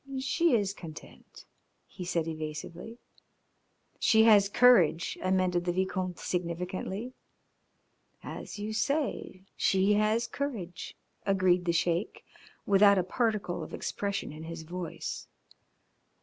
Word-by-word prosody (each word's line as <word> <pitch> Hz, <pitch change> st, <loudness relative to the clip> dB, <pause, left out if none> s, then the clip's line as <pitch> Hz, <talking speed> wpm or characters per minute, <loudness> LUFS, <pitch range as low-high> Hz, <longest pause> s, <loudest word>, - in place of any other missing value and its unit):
"She 280 Hz, +3 st, +2 dB
is 200 Hz, -3 st, 0 dB
content," 165 Hz, -5 st, -12 dB, 0.4 s
he 185 Hz, -, -9 dB
said 170 Hz, -2 st, -1 dB
evasively. 160 Hz, +7 st, -6 dB, 1.0 s
"She 220 Hz, 0 st, +5 dB
has 205 Hz, -3 st, +6 dB
courage," 195 Hz, -9 st, +4 dB
amended 185 Hz, -1 st, +1 dB
the 175 Hz, -, 0 dB
Vicomte 185 Hz, 0 st, -2 dB
significantly. 180 Hz, +6 st, -4 dB, 1.1 s
"As -, -, -7 dB
you 210 Hz, +1 st, -4 dB
say, 270 Hz, -6 st, -2 dB
she 195 Hz, +2 st, +3 dB
has 215 Hz, +3 st, +2 dB
courage," 230 Hz, -9 st, -5 dB, 0.3 s
agreed 185 Hz, -2 st, +2 dB
the 170 Hz, -, +2 dB
Sheik, 170 Hz, +4 st, -1 dB, 0.4 s
without 200 Hz, 0 st, +6 dB
a 185 Hz, -, +2 dB
particle 205 Hz, -4 st, -1 dB
of 155 Hz, -, -6 dB
expression 200 Hz, -5 st, -3 dB
in 155 Hz, +2 st, -9 dB
his 165 Hz, 0 st, -7 dB
voice. 175 Hz, 0 st, -6 dB
185 Hz, 110 wpm, -29 LUFS, 175-215 Hz, 1.1 s, has